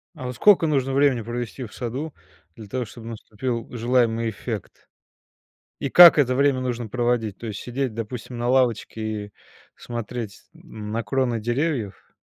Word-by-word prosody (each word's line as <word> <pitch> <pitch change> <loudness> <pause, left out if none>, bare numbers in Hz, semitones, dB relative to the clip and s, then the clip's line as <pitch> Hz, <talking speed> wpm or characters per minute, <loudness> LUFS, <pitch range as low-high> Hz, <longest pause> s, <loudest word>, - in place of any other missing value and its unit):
А, 130 - -7
вот, 125 - -4
сколько 190 - +5
нужно 135 -3 +1
времени 140 -4 +3
провести 120 +2 -5
в 110 - -11
саду, 130 +5 -4 0.4
для 110 - -10
того, 125 +4 -3
чтобы 115 +1 -10
наступил 115 +1 -4
желаемый 115 -1 +1
эффект? 100 - -7 0.9
И 140 - -2
как 175 -3 +10
это 130 -3 +3
время 140 -1 +3
нужно 120 -2 -3
проводить? 120 -3 0
То 120 - -7
есть 105 -2 -5
сидеть, 130 0 -3
допустим, 115 +2 -6
на 120 +1 -1
лавочке 125 -3 +1 0.3
и 105 - -19 0.4
смотреть 115 -2 -6
на 110 +1 -6
кроны 120 0 0
деревьев? 120 -3 -2
120 Hz, 150 wpm, -24 LUFS, 115-130 Hz, 0.9 s, как